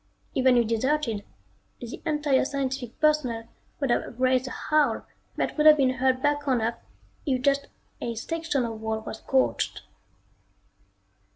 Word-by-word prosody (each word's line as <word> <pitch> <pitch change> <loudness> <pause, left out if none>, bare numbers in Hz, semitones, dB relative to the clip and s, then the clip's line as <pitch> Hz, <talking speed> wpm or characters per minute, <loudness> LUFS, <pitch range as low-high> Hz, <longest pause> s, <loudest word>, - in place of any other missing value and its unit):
Even 260 -1 +4
if 235 - +4
deserted, 230 -1 0 0.6
the 240 0 -8
entire 295 -3 +2
scientific 265 -3 -3
personnel 295 -7 +2 0.4
would 275 -4 0
have 240 0 -1
raised 255 0 +2
a - - -4
howl 305 +3 +1 0.3
that - - -1
would 305 0 +4
have 305 0 +9
been 265 -3 +3
heard 260 0 +1
back 290 0 +1
on 255 -3 +3
Earth 230 +1 -1 0.5
if 260 -2 +2
just 280 +1 +2 0.3
a 235 - -3
section 320 +1 -1
of 225 -1 -6
wall 220 0 -2
was 220 0 -7
scorched. 265 -1 0
260 Hz, 150 wpm, -26 LUFS, 235-290 Hz, 0.6 s, have